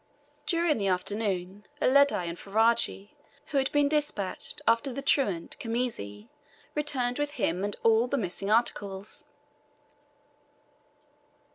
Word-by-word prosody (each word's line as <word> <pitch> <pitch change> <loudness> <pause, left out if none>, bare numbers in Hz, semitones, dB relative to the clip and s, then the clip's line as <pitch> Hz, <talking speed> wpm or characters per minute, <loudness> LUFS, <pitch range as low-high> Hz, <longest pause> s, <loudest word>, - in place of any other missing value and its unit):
During 335 - +2
the 200 - 0
afternoon, 190 0 -1 0.2
Uledi 280 - +4
and 170 - -4
Ferajji, 210 0 +1 0.3
who 280 - 0
had 265 - 0
been 290 -1 +3
despatched 290 -10 -1
after 230 +4 +3
the 275 +2 -5
truant 200 - +1
Khamisi, 225 - -3 0.5
returned 275 -4 -1
with 290 0 -1
him 190 - -1
and 205 0 -1
all 225 +1 +4
the 280 - -1
missing 195 -2 -3
articles. 205 -3 -1
225 Hz, 115 wpm, -28 LUFS, 195-275 Hz, 0.5 s, Uledi